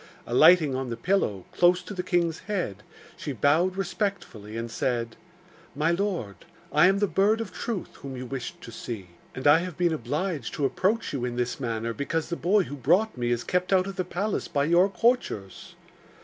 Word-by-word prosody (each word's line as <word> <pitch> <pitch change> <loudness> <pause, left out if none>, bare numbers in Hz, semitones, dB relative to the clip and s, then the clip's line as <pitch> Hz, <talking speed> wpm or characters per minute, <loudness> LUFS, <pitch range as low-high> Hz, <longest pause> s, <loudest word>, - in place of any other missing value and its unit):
Alighting 155 +3 +5
on 130 -1 -3
the 115 - -4
pillow, 115 - 0
close 180 +1 +3
to 205 - -7
the 185 - -2
king's 170 -3 0
head, 180 - -1 0.4
she 145 - -5
bowed 155 - +2
respectfully, 180 - -3
and 115 0 -4
said: 115 -2 -1 0.6
'My 155 +3 +2
lord, 170 - -2 0.4
I 150 +4 +6
am 195 +1 +3
the 205 - +2
Bird 205 +3 +2
of 210 -5 -5
Truth 205 +2 -5
whom 135 -2 -7
you 130 - -5
wished 130 -1 -6
to 115 - -9
see, 110 -5 -7 0.3
and 130 - -6
I 145 +2 +7
have 180 -2 -5
been 175 -2 +2
obliged 150 - -3
to 145 - 0
approach 200 - 0
you 135 -4 -2
in 125 -1 -2
the 120 0 -1
manner 115 -2 -2
because 155 +5 -2
the 170 - -1
boy 195 +4 +3
who 145 - -7
brought 180 - +2
me 120 -1 -1
is 120 -1 0
kept 180 +8 -1
out 185 -1 +4
of 195 0 -6
the 185 - -1
palace 190 +4 -2
by 140 - 0
your 170 +5 +4
courtiers. 195 - -1
160 Hz, 195 wpm, -26 LUFS, 125-185 Hz, 0.6 s, I